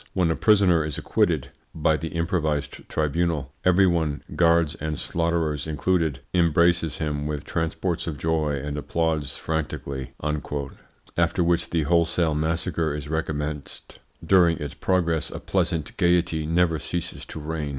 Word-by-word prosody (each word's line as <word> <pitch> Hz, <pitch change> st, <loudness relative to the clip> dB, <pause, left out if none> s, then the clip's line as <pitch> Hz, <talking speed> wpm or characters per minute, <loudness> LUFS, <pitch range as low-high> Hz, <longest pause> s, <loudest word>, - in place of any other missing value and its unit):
When 90 Hz, -3 st, +2 dB
a -, -, +1 dB
prisoner 95 Hz, -6 st, +4 dB
is 75 Hz, -2 st, -4 dB
acquitted -, -, +1 dB, 0.3 s
(by 80 Hz, 0 st, +2 dB
the 80 Hz, -, -4 dB
improvised 80 Hz, -4 st, -2 dB
tribunal) 80 Hz, -2 st, 0 dB
every 90 Hz, +1 st, +5 dB
one, 80 Hz, -5 st, 0 dB
guards 85 Hz, -2 st, +4 dB
and 80 Hz, -2 st, -4 dB
slaughterers 80 Hz, -3 st, -1 dB
included, 80 Hz, -2 st, 0 dB
embraces 85 Hz, -1 st, +3 dB
him 75 Hz, -1 st, -2 dB
with 75 Hz, -2 st, -4 dB
transports 80 Hz, +1 st, -2 dB
of 80 Hz, -3 st, -3 dB
joy 80 Hz, 0 st, 0 dB
and 70 Hz, +2 st, -4 dB
applauds 80 Hz, -2 st, -1 dB
frantically," 70 Hz, -4 st, -3 dB, 1.1 s
after 85 Hz, +1 st, +2 dB
which 85 Hz, 0 st, +1 dB
the 80 Hz, -2 st, +1 dB
wholesale 85 Hz, 0 st, +2 dB
massacre 80 Hz, 0 st, 0 dB
is 75 Hz, 0 st, -6 dB
recommenced. 75 Hz, -2 st, -4 dB, 0.3 s
During 85 Hz, -4 st, +5 dB
its 75 Hz, 0 st, -5 dB
progress 85 Hz, -3 st, 0 dB
a -, -, -6 dB
pleasant 80 Hz, -3 st, -1 dB
gaiety 85 Hz, -4 st, +2 dB
never 85 Hz, -1 st, +2 dB
ceases 85 Hz, +4 st, -4 dB
to -, -, -7 dB
reign. 75 Hz, -1 st, -3 dB
80 Hz, 140 wpm, -25 LUFS, 75-85 Hz, 1.1 s, every